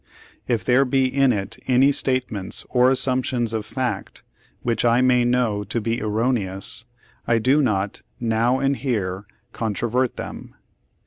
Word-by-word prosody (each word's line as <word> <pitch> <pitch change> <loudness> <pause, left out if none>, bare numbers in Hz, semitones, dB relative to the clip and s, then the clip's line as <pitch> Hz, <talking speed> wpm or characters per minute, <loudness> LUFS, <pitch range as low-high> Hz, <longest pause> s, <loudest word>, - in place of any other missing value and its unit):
"If 115 -5 0
there 125 +2 +4
be 135 0 +2
in 135 0 +3
it 100 -4 -3
any 130 +2 +5
statements 130 -8 -2
or 125 0 +4
assumptions 125 -3 0
of 110 -1 -3
fact 125 -7 -4 0.4
which 115 -2 0
I 120 0 +4
may 125 -1 +4
know 120 -4 +1
to 120 - -2
be 115 +1 -2
erroneous, 110 -2 -1 0.4
I 115 - +3
do 130 +6 +3
not 105 -6 -1 0.2
now 115 +2 +1
and 135 +1 +1
here 100 -7 -2 0.3
controvert 120 +3 -1
them. - - -8
120 Hz, 140 wpm, -22 LUFS, 110-130 Hz, 0.4 s, any